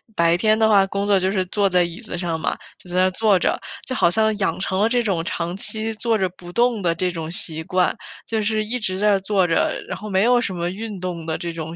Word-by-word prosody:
白 170 0 +3
天 215 +4 +3
的 220 -1 +4
话 200 -3 +5
工 200 +1 -2
作 200 -2 +3
就 190 +1 0
是 190 -2 0
坐 200 0 +1
在 180 -1 +3
椅 170 +4 -5
子 220 -6 -6
上 170 -2 -2
嘛， - - -2 0.2
就 180 - -15
在 180 - -5
那 185 - +4
坐 205 0 +3
着， - - 0 0.3
就 260 - -3
好 170 - +4
像 220 +3 +2
养 195 - 0
成 190 0 -1
了 220 - +3
这 245 -1 +2
种 180 -6 0
长 170 +1 -3
期 220 +2 -3
坐 225 0 0
着 190 -2 +1
不 175 0 -12
动 235 0 +2
的 170 -2 +1
这 180 +1 -1
种 165 -2 -5
习 160 -2 -1
惯， 180 +1 +1 0.3
就 220 -1 0
是 215 0 0
一 245 +3 -1
直 185 -3 -2
在 205 -1 +3
坐 190 -1 +1
着， 165 - +2 0.2
然 - - -4
后 215 - -8
没 190 +1 +2
有 245 0 +4
什 190 - -3
么 170 0 -2
运 205 0 -6
动 175 -3 -5
的 160 - -2
这 170 -1 -5
种 165 0 -6
190 Hz, 285 characters per minute, -22 LUFS, 175-215 Hz, 0.3 s, 话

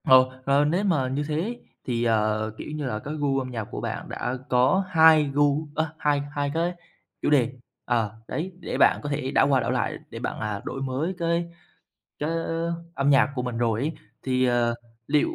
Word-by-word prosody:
Ồ, 130 0 +6
ờ, 140 +1 +4
nếu 175 +7 +1
mà 160 -10 +2
như 145 +2 0
thế 180 +11 -2 0.3
thì, 120 -2 -1
ờ, 110 -1 +1
kiểu - - -7
như 150 -2 -3
là, 110 -5 -2
cái 145 +7 -6
gu 140 -2 +1
âm 130 -1 -5
nhạc 115 -3 -3
của - - -5
bạn - - -4
đã 125 +2 -3
có 130 +10 +4
hai 160 -3 +7
gu 145 +2 +2
ơ, 160 -1 -1
hai 145 -2 +1
hai 145 -1 -1
cái 170 +2 0 0.5
chủ - - +1
đề, 135 -4 +3 0.3
ờ 115 -4 +1 0.2
đấy, 175 +5 -3
để - - -4
bạn - - +5
có 145 - -3
thể 140 -2 -2
đảo - - +4
qua 135 -2 +4
đảo - - -1
lại, - - -1
để - - -7
bạn, - - -4
à, 105 -2 -3
đổi 135 - -4
mới 135 +7 -1
cái 170 0 0 0.7
cái 150 +2 -1 0.6
âm 140 +1 +2
nhạc 135 -1 +5
của 125 - -2
mình 125 -2 -3
rồi 115 -2 +1
ấy. 150 +4 -1 0.3
Thì, 130 -1 +1
ờ, 120 -1 +2 0.3
liệu 150 0 +3
140 Hz, 205 wpm, -25 LUFS, 125-155 Hz, 0.7 s, hai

